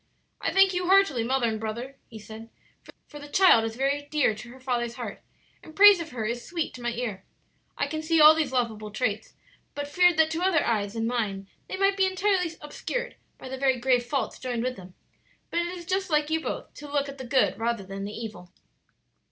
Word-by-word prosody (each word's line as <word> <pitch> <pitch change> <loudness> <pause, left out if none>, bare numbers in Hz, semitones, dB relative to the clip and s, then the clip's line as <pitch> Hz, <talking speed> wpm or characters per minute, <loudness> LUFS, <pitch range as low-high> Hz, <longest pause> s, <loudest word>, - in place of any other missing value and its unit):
"I - - 0
thank 390 0 +5
you 360 0 -1
heartily, 380 -11 +4
mother 255 0 +1
and 220 -1 -2
brother," 235 +5 -5
he 225 - -11
said; 220 +1 -11 0.6
"for 295 - -11
the 290 - -10
child 290 -7 +5
is 225 0 -4
very 275 +3 0
dear 300 -7 +2
to 215 +3 -10
her 255 +2 -13
father's 240 -2 -2
heart, - - -7 0.4
and 315 - -14
praise 405 -1 +8
of 330 -1 -5
her 235 -6 -4
is 235 +2 -3
sweet 340 -2 -3
to 250 - -10
my 240 - -1
ear. 225 -5 -4 0.5
I - - +1
can 310 -1 -4
see 325 +1 +1
all 305 +1 +10
these 310 -4 -1
lovable 225 -4 -2
traits, 215 -1 -3 0.4
but 285 0 -4
feared 355 +2 +4
that 320 0 +4
to 330 - -2
other 365 -4 +2
eyes 205 -3 -1
than 225 -1 -2
mine 210 -5 -2 0.2
they - - -4
might 390 0 +2
be 380 -1 +3
entirely 375 -1 +1
obscured 485 +11 -5 0.2
by - - -10
the 260 0 -6
very 265 -1 +2
grave 250 0 +2
faults 270 +2 -3
joined 245 -2 -3
with 255 0 -2
them. 185 -1 -13 0.6
But 340 - 0
it 345 - -1
is 345 - -10
just 380 +1 -1
like 300 -1 +1
you 320 0 +1
both - - -5
to 290 -1 -10
look 285 -1 0
at 275 0 -9
the - - -5
good 260 -2 +2
rather 230 -2 -1
than 195 +1 -7
the 205 - -5
evil. 215 -6 -8
265 Hz, 225 wpm, -26 LUFS, 230-320 Hz, 0.6 s, all